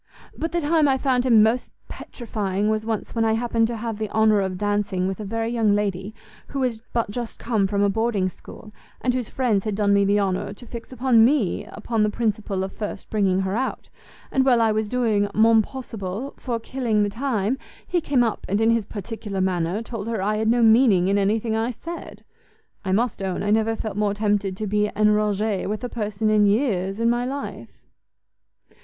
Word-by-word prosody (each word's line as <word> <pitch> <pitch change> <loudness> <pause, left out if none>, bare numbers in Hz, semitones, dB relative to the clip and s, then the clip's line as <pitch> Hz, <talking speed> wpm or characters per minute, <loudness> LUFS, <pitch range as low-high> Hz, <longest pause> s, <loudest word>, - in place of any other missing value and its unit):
But 325 - -3
the 345 - 0
time 310 0 +3
I 265 -1 +3
found 260 -2 +1
him 225 -4 +6
most 230 +3 +1 0.2
petrifying 210 -3 -3
was 215 0 -2
once 220 -2 -3
when 230 - +1
I 220 0 +2
happened 230 0 +1
to 235 0 -4
have 225 -1 -4
the 215 -1 -2
honour 215 -1 +3
of 190 -1 -2
dancing 205 -2 0
with 190 +1 -4
a - - -4
very 225 +3 -2
young 220 -4 +2
lady, 200 0 -2 0.3
who 275 - -4
was 245 -4 -1
but 230 -3 -1
just 235 +1 -5
come 220 -5 +1
from 200 +1 0
a - - +4
boarding 215 -2 0
school, 210 +3 -11 0.3
and 250 - +1
whose 250 -3 -2
friends 230 -7 +1
had 215 -2 -2
done 200 -1 +2
me 200 0 +4
the 200 +1 +3
honour 195 0 -1
to 245 - -13
fix 235 0 -9
upon 255 -3 +4
me 245 - +2
upon 220 +1 -2
the 210 - +3
principle 210 -3 -1
of 190 - -4
first 210 -2 -6
bringing 195 -3 +2
her 190 +1 -1
out: 260 +3 -3 0.4
and 265 - +3
while 255 -3 +4
I 225 -1 +3
was 215 0 -1
doing 220 -5 +1
mon 225 +1 +6
possible 225 -1 -6
for 240 -3 -3
killing 230 -3 0
the 205 - 0
time, 230 +1 -1 0.3
he 350 - 0
came 275 -5 +2
up, 225 -3 -2
and 200 +2 +1
in 225 +1 +4
his 230 -3 +1
particular 205 -1 -6
manner, 185 +2 0
told 225 -2 -6
her 230 -2 -2
I 210 +3 0
had 220 0 0
no 235 +1 +3
meaning 220 -5 +5
in 200 +1 +2
any 200 +2 +2
thing 220 0 -2
I 225 +2 0
said! 335 +8 -8 0.6
I 190 - -2
must 225 +2 0
own 190 -1 -2
I 205 - 0
never 220 +1 +2
felt 215 -2 -5
more 205 -1 +1
tempted 205 -2 0
to 215 - -3
be 210 +1 +1
enrage 210 -1 +1
with 210 +4 -3
a 245 - -3
person 215 -1 -1
in 210 -1 +4
years, 200 -3 0
in 230 - +2
my 240 +1 +2
life." 275 +3 -6
215 Hz, 210 wpm, -23 LUFS, 205-235 Hz, 0.6 s, him